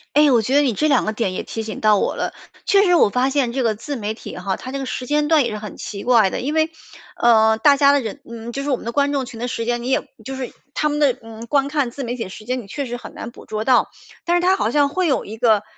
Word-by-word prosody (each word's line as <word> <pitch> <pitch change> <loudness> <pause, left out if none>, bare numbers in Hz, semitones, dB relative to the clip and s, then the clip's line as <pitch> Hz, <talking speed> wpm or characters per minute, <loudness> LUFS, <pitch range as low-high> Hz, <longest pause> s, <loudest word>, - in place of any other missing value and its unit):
诶， 295 0 +6
我 240 -4 +4
觉 255 - -1
得 290 - +6
你 260 -5 +1
这 305 +9 +1
2 290 - +3
个 215 - 0
点 215 -4 -2
也 - - -3
提 225 - -5
醒 215 0 -6
到 215 -1 +5
我 - - 0
了。 - - -3 0.3
确 400 -1 +5
实 355 - +3
我 335 - +5
发 250 +5 +1
现 265 -4 +1
这 260 +1 -1
个 225 -2 +2
自 255 +7 -6
媒 215 -3 -3
体 220 - -9
哈， 195 -1 -2
它 255 - -8
这 275 - -3
个 270 - -4
时 250 0 -5
间 295 +1 +1
段 310 -2 +4
也 235 - -1
是 215 - -4
很 210 -1 -8
奇 200 -1 -7
怪 235 -5 +4
的。 - - -4
因 280 +5 -2
为， 315 0 +2 0.5
呃， 220 -2 +4
大 285 +4 +5
家 280 0 +6
的 285 - +3
人 240 +3 -6
嗯， 230 0 -7
就 275 +3 -4
是 285 - -3
我 270 - +3
们 - - -12
的 235 - -2
观 285 +3 +1
众 275 -2 -1
群 240 -3 -10
的 245 - -2
时 230 -2 -3
间， 240 0 -1
你 245 - -4
也 265 - 0 0.2
就 270 +4 -6
是 260 -2 -5 0.2
他 300 - +1
们 295 0 -1
的， 270 -4 +3
嗯， 225 +1 -10
观 280 +1 +2
看 285 -3 0
自 270 +3 -6
媒 240 0 -3
体 235 - -4
的 - - -9
时 215 +3 -11
间 250 +1 -2
你 200 - -14
确 280 +7 -4
实 245 -1 -5
很 245 - -10
难 230 - -7
捕 - - -15
捉 215 0 -3
到。 255 -2 +4 0.3
但 345 +1 +2
是 - - 0
它 370 +2 +4
好 220 - 0
像 285 +3 +3
会 365 +5 0
有 275 - 0
一 220 +2 -8
个 220 -3 +3
250 Hz, 340 characters per minute, -21 LUFS, 225-285 Hz, 0.5 s, 诶